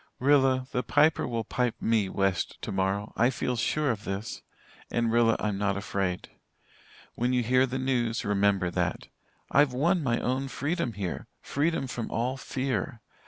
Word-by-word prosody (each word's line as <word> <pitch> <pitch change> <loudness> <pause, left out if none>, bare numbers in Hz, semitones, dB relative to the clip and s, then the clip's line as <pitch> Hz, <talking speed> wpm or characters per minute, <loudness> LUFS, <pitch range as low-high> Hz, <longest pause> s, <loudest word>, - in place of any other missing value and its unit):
"Rilla, 130 -1 +3
the 125 - 0
Piper 150 +3 +3
will 115 -2 -2
pipe 125 +2 -1
me 110 -4 +1
'west' 95 -2 -1
tomorrow. 95 +2 -2
I 120 +2 +4
feel 125 0 -2
sure 145 +4 +1
of 105 -2 -5
this. 100 +2 -4 0.5
And 115 -1 0
Rilla, 115 -1 +4
I'm 105 -2 -1
not 100 -1 +1
afraid. 95 -2 -2 0.8
When 125 +2 0
you 125 -1 +2
hear 130 +3 +3
the 130 +1 -3
news, 120 -3 0
remember 100 -3 +2
that. - - -2 0.4
I've 140 -1 +4
won 170 +8 +2
my 120 -5 +1
own 130 +2 -1
freedom 140 0 -2
here 95 -5 -4 0.2
freedom 150 0 0
from 120 -3 -4
all 125 +3 -1
fear. 130 -3 -3
120 Hz, 160 wpm, -28 LUFS, 105-130 Hz, 0.8 s, I